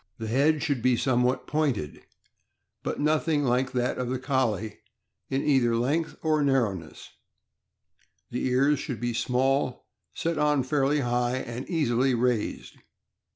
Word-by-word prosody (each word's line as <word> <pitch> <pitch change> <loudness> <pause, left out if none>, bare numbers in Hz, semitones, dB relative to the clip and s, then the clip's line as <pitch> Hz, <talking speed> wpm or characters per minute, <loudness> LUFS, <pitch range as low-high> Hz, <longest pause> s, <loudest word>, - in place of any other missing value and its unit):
The 110 - -5
head 145 +6 +2
should 145 -6 -1
be 125 0 +3
somewhat 125 +1 +1
pointed, 140 - -1 0.8
but - - -4
nothing 150 0 +1
like 130 0 +1
that 125 0 -1
of 125 -1 -2
the 130 - -1
Collie 120 -6 -1 0.5
in 135 +1 -1
either 130 -5 +3
length 145 +8 0
or 155 -1 +2
narrowness; 115 - -1 1.2
the 125 - -1
ears 135 +3 +3
should 130 -8 -5
be 120 0 -2
small, 130 +2 0 0.3
set 165 -2 -1
on 150 -2 +2
fairly 140 +2 +1
high, 120 0 0
and 120 0 -6
easily 135 -6 +1
raised. 120 -2 -1
130 Hz, 135 wpm, -27 LUFS, 120-145 Hz, 1.2 s, be